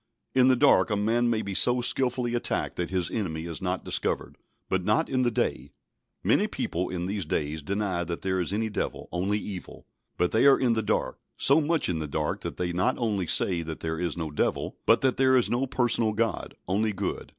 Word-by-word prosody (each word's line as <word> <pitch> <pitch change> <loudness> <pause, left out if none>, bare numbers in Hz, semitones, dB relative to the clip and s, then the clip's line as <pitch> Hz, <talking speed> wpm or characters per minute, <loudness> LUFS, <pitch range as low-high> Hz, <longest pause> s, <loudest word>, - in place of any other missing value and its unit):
In 130 -1 +5
the 130 - +5
dark 140 0 +4
a 105 - +1
man 115 +4 +1
may 110 -2 0
be 100 -1 -4
so 125 +6 +3
skilfully 125 -1 0
attacked 120 - -1
that 90 - -2
his 90 -2 -1
enemy 80 -7 -3
is 85 +2 -5
not 90 0 -2
discovered, - - -2 0.3
but 95 -1 0
not 105 +3 +2
in 130 - 0
the 125 - +3
day. 110 - -1 0.5
Many - - +3
people 90 +2 -3
in 90 -1 -3
these 100 +1 -2
days 75 0 -2
deny 95 +1 -1
that 85 0 -5
there 95 -1 0
is 90 - -2
any 110 +2 0
Devil, 105 - -4
only 95 +4 0
evil; 100 -3 -7 0.3
but 90 - +1
they 115 +5 +4
are 140 - +7
in 125 -3 +3
the 110 - 0
dark, 105 - -1 0.2
so 140 +4 +5
much 160 +1 +1
in 85 -3 -1
the 75 - -3
dark 75 +1 -2
that - - -6
they 90 -1 -2
not 95 +9 +1
only 105 -7 -1
say 85 0 +1
that 80 -1 -6
there 80 0 -3
is 85 -3 -2
no 80 -3 -3
Devil, 75 - -1
but - - +5
that 130 -1 +1
there 130 -1 +4
is 125 - +1
no 125 +3 +1
personal 120 -3 +1
God, 115 +1 -2
only 105 +3 +1
good. - - -4
105 Hz, 220 wpm, -27 LUFS, 90-120 Hz, 0.5 s, are